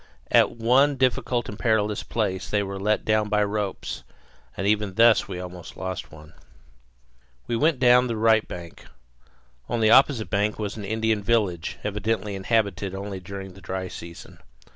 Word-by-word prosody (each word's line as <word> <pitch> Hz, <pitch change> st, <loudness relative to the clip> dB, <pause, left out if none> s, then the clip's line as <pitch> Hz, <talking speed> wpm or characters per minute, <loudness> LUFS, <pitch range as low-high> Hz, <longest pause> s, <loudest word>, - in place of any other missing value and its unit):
At -, -, +5 dB
one 130 Hz, +5 st, +3 dB
difficult 125 Hz, -2 st, 0 dB
and 105 Hz, -, -8 dB
perilous 105 Hz, -2 st, +1 dB
place 100 Hz, -5 st, -2 dB
they 105 Hz, -1 st, +1 dB
were 100 Hz, 0 st, -5 dB
let 105 Hz, +2 st, 0 dB
down 110 Hz, -1 st, +1 dB
by 105 Hz, 0 st, +2 dB
ropes; 105 Hz, -1 st, -3 dB, 0.6 s
and 95 Hz, -, -2 dB
even 105 Hz, -2 st, +1 dB
thus 115 Hz, 0 st, +5 dB
we 95 Hz, -3 st, -5 dB
almost 90 Hz, -1 st, -9 dB
lost 95 Hz, -1 st, -5 dB
one. 75 Hz, 0 st, -14 dB, 1.1 s
We 120 Hz, -, -2 dB
went 155 Hz, +4 st, +2 dB
down 125 Hz, 0 st, +5 dB
the 115 Hz, -2 st, -3 dB
right 110 Hz, 0 st, +3 dB
bank. 85 Hz, -2 st, -9 dB, 0.8 s
On 120 Hz, -, -1 dB
the 110 Hz, -1 st, +4 dB
opposite 130 Hz, -4 st, +4 dB
bank 105 Hz, +1 st, 0 dB
was 105 Hz, -2 st, -4 dB
an 105 Hz, -2 st, -6 dB
Indian 110 Hz, +1 st, 0 dB
village, 100 Hz, -6 st, 0 dB
evidently 105 Hz, 0 st, -2 dB
inhabited 100 Hz, -2 st, -1 dB
only 100 Hz, 0 st, -5 dB
during 95 Hz, +1 st, -8 dB
the 95 Hz, -, -15 dB
dry 95 Hz, -1 st, -4 dB
season. 85 Hz, 0 st, -10 dB
105 Hz, 165 wpm, -25 LUFS, 95-115 Hz, 1.1 s, At